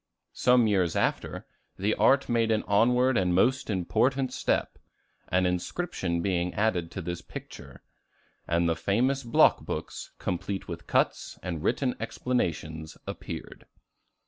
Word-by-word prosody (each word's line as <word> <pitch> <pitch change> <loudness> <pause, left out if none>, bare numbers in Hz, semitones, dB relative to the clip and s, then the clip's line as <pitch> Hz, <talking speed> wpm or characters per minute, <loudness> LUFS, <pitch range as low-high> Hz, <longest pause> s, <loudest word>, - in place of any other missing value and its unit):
Some 125 -1 +4
years 95 -6 +2
after, - - -1 0.3
the 105 +3 +1
art 135 +1 +4
made 115 -1 +2
an 110 -1 +1
onward 125 +4 +3
and 90 -2 +1
most 130 +8 +2
important 125 +7 +1
step, - - -1 0.5
an 90 +1 +2
inscription 90 - -2
being 90 -2 0
added 95 -6 +1
to 95 - -5
this 85 +1 -4
picture; - - -10 0.6
and 85 0 +2
the 80 - +1
famous 120 - +1
block 115 -3 +4
books, - - -5
complete 95 +2 -3
with 85 -1 -7
cuts - - 0
and 85 -4 -4
written 125 - +1
explanations, 80 -10 -3
appeared. - - -7
100 Hz, 130 wpm, -28 LUFS, 85-125 Hz, 0.6 s, Some